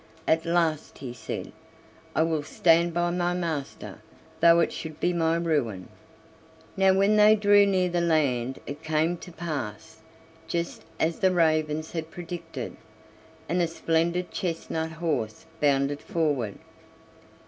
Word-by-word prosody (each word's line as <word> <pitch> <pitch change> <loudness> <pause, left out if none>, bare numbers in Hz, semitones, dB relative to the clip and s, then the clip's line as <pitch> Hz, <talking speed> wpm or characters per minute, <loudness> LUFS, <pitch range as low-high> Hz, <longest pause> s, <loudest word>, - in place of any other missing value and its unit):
At 160 +1 +2
last 165 -3 0
he 130 -3 -7
said: 115 - -6 0.6
"I 160 - +4
will 160 -2 0
stand 170 +3 +3
by 175 +1 0
my 175 0 0
master, 160 -6 -4 0.4
though 170 +1 +6
it 170 - +1
should 160 -1 -7
be 175 +2 +1
my 165 -1 +2
ruin." 145 - -1 0.9
Now 190 0 +4
when 200 +2 +3
they 210 +1 +7
drew 205 -1 +5
near 185 -2 +2
the 175 -1 0
land 135 -7 +1
it 145 +1 -7
came 160 +2 +1
to 180 - -11
pass 160 -4 -5 0.5
just 170 0 -3
as 165 +1 0
the 190 - +4
ravens 155 -3 +1
had 160 -1 -4
predicted, 175 -1 -7 0.7
and 175 +3 +1
a 170 - +2
splendid 165 +2 0
chestnut 160 -2 -3
horse 155 -8 -2
bounded 140 0 +1
forward. 145 -11 -1
165 Hz, 135 wpm, -26 LUFS, 155-175 Hz, 0.9 s, they